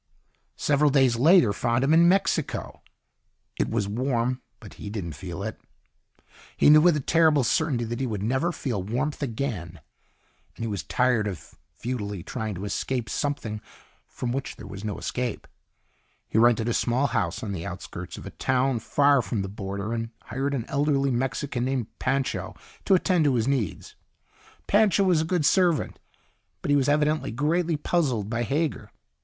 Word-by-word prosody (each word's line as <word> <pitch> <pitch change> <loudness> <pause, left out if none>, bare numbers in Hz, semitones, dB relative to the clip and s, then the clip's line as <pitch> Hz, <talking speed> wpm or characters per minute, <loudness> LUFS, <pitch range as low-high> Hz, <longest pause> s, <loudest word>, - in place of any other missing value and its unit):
Several 145 0 +3
days 135 -4 +4
later 150 - +5
found 120 +4 0
him 145 +3 +3
in 170 +1 +6
Mexico. 195 +2 0 0.8
It - - +1
was 110 -3 -1
warm 125 +2 -1 0.2
but - - -12
he - - -5
didn't 100 -6 -4
feel 85 +5 -6
it. 110 - -6 1.0
He - - +6
knew 155 0 +8
with 170 -1 +5
a - - -2
terrible 155 -1 +4
certainty 140 -1 +1
that 120 +1 -4
he 135 - -1
would 105 -4 -3
never 130 +10 +1
feel 120 - -3
warmth 125 +11 -2
again. 110 - -4 0.8
And - - -6
he - - -1
was 105 -4 -2
tired 125 -4 +1
of 90 -8 -7 0.2
futilely 105 -7 -4
trying 110 +1 -4
to 95 +3 -5
escape 120 +2 -2
something 115 -8 -2 0.5
from 120 - -4
which 135 +2 -3
there - - -11
was 100 0 -8
no 105 -2 -3
escape. 125 -3 -3 0.8
He 110 - +1
rented 115 -1 +4
a 120 - +1
small 125 +5 +1
house 100 -4 -1
on 105 - -3
the 85 -4 -4
outskirts - - -7
of - - -9
a - - -7
town 130 -1 0
far 140 +2 +3
from 100 -1 -2
the 95 - -5
Border 100 +1 -4
and 115 0 -3
hired 140 +2 -2
an 120 -4 -3
elderly 140 -1 +1
Mexican 130 0 -1
named 130 -4 -3
Pancho 135 +1 -1 0.3
to 195 - +5
attend 180 -3 +2
to 140 -3 +3
his 115 0 +1
needs. 125 -11 -2 0.7
Pancho 205 -1 +4
was 180 -4 +3
a - - -1
good 165 -2 0
servant. 175 -4 +2 0.6
But - - 0
he - - +5
was 140 -1 +2
evidently 150 +1 +2
greatly 160 +6 0
puzzled 130 - 0
by 120 0 -1
Hager. 140 -3 -1
125 Hz, 170 wpm, -26 LUFS, 110-145 Hz, 1.0 s, knew